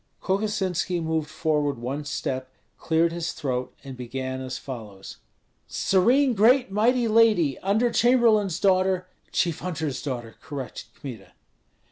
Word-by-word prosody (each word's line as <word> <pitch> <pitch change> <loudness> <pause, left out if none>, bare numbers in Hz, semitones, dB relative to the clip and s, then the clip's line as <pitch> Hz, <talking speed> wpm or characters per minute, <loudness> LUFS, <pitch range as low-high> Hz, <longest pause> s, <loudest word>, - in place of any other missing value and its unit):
Kokosinski 190 -3 -1
moved 160 -2 -1
forward 150 -3 0
one 135 +5 -4
step, 130 -2 -3 0.3
cleared 165 +1 +2
his 170 0 -3
throat, 125 -2 -3
and 135 -2 -8
began 130 +1 -5
as 130 -1 -5
follows: 105 -7 -9 0.5
"Serene 245 +8 +3
great 240 +3 +4
mighty 235 +4 +2
lady, 215 - +4
under 220 +5 +1
chamberlain's 225 -7 +3
daughter 185 -1 +2
" - - -38
"Chief 170 -3 0
hunter's 160 -6 -3
daughter," 120 -5 -5
corrected 140 -5 -7
Kmita. 110 -9 -9
160 Hz, 125 wpm, -25 LUFS, 130-205 Hz, 0.5 s, great